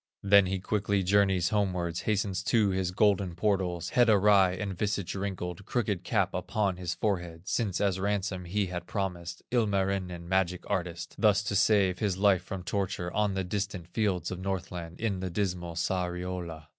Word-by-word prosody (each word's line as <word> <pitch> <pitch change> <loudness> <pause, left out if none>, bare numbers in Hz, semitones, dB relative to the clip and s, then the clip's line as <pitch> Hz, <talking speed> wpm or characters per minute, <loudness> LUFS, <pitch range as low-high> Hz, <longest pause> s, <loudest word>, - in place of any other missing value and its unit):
Then 100 -1 +6
he 95 +1 -1
quickly 100 0 0
journeys 95 -2 +3
homeward, 90 -5 0
Hastens 100 -3 -1
to 110 -4 +3
his 95 -1 0
golden 95 -2 +2
portals, 90 -3 0
Head 120 -2 +4
awry 100 -3 +5
and 100 0 -4
visage 100 -2 -2
wrinkled, 95 -2 -4
Crooked 105 -7 -1
cap - - +1
upon 100 -4 -1
his 90 -1 -3
forehead, 85 -5 -2
Since 100 -6 0
as 95 -2 +1
ransom 95 -2 -1
he 100 +4 0
had 90 -1 -5
promised 90 -4 -4
Ilmarinen, 95 -6 0
magic 90 -1 0
artist, 85 -2 -3
Thus 105 -2 +4
to 105 0 -2
save 95 -3 +3
his 100 -4 0
life 100 -2 +4
from 95 0 -6
torture 95 -3 -2
On 105 -2 +1
the 95 - 0
distant 95 -2 -4
fields 95 -5 -1
of 90 - -4
Northland, 90 -3 -4
In 105 -4 -1
the 95 0 -3
dismal 90 -2 -2
Sariola. 90 -2 -3
95 Hz, 165 wpm, -29 LUFS, 90-100 Hz, -, Then